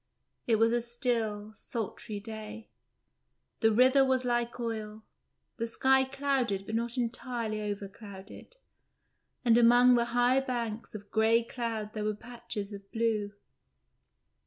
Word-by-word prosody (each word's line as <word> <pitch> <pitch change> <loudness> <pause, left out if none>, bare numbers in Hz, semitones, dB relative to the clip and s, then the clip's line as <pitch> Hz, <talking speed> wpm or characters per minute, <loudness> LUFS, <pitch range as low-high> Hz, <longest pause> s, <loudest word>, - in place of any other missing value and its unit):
It 230 - +4
was 225 +1 +3
a 240 0 +1
still, 230 -3 -1
sultry 215 -1 -5
day. 220 +1 -8 0.9
The 225 -1 +4
river 255 +4 +5
was 260 -1 +1
like 240 0 -1
oil, 220 -2 -4 0.5
the 230 - -2
sky 265 +3 +3
clouded 265 -7 -1
but 220 - -6
not 235 +2 -1
entirely 235 -2 -2
overclouded, 200 - -8 0.9
and 235 0 +6
among 245 +1 +6
the 235 -1 +3
high 245 +2 +3
banks 235 -4 -4
of 205 -1 -9
grey 225 +1 +3
cloud 225 -3 -4
there 215 - -3
were 210 0 -1
patches 235 -3 -6
of 200 0 -11
blue. 220 -3 0
230 Hz, 130 wpm, -30 LUFS, 215-245 Hz, 0.9 s, and